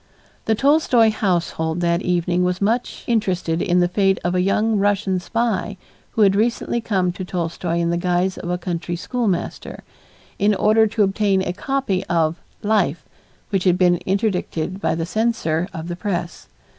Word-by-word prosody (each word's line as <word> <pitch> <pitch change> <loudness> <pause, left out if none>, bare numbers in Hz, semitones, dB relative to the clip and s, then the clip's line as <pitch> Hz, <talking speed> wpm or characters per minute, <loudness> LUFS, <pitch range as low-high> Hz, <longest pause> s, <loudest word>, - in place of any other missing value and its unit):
The 220 - +2
Tolstoy 265 -4 +4
household 175 -5 -1
that 170 0 +1
evening 180 0 0
was 180 0 0
much 230 +5 -1
interested 180 -7 0
in 180 -2 +2
the 175 - +3
fate 195 +1 +1
of 175 - 0
a 180 - +2
young 210 +3 +1
Russian 200 -2 +1
spy 230 +2 -2 0.4
who 220 - +3
had 195 -1 +4
recently 235 +2 0
come 190 -5 0
to 185 +2 -7
Tolstoy 170 -1 -3
in 170 0 +1
the 170 - 0
guise 180 +1 0
of 175 - -6
a 180 - 0
country 175 -1 -4
schoolmaster, 200 -1 -3 0.6
in 205 +1 +3
order 220 +2 +4
to 215 0 +1
obtain 195 -1 +1
a 175 - -2
copy 235 -3 -1
of 165 -1 +1 0.3
"Life," 205 -7 +1 0.5
which 195 -2 0
had 180 -1 +4
been 180 -1 +4
interdicted 190 -2 -1
by - - +1
the 165 0 -2
censor 180 -6 0
of 165 -3 -6
the 175 - -4
press. 175 -3 -4
185 Hz, 170 wpm, -21 LUFS, 175-210 Hz, 0.6 s, Tolstoy